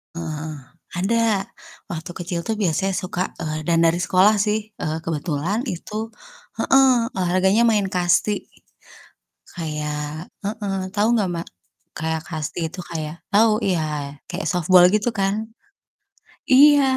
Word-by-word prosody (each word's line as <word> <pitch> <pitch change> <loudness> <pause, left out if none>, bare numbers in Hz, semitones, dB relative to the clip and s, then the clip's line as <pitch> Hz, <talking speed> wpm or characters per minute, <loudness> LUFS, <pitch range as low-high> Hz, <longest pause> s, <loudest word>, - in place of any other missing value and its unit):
Heeh 165 -1 -4
heeh, 155 -1 -5 0.4
ada 230 +6 +2 0.7
waktu 170 +1 -5
kecil 175 -1 -3
tuh 220 - 0
biasanya 195 -1 0
suka 180 -1 -3 0.2
eee, 155 -1 -3
dan 170 -1 +3
dari 165 +1 +3
sekolah 190 +3 +4
sih, 210 0 +2 0.2
eee, 155 0 -1
kebetulan 165 +4 -1
itu 215 +4 -5 0.5
heeh, 270 0 +5 0.3
olahraganya 185 +3 +2
main 210 -3 +2
kasti. 185 +3 +1 1.0
Kayak 150 -1 -4 0.2
heeh, 205 -1 -3 0.2
tahu 210 0 +2
nggak 200 -4 +1
Mbak? 170 0 -5 0.5
Kayak 160 0 -2
kasti 155 0 -4
itu 180 - -10
kayak 155 -1 -4 0.2
tahu 220 +2 +6
iya, 180 -4 +1 0.5
kayak 180 +2 -4
softball 180 0 +5
gitu 215 +2 +2
kan. 195 0 +2 1.2
Iya 290 +2 +8
180 Hz, 125 wpm, -22 LUFS, 160-205 Hz, 1.2 s, Iya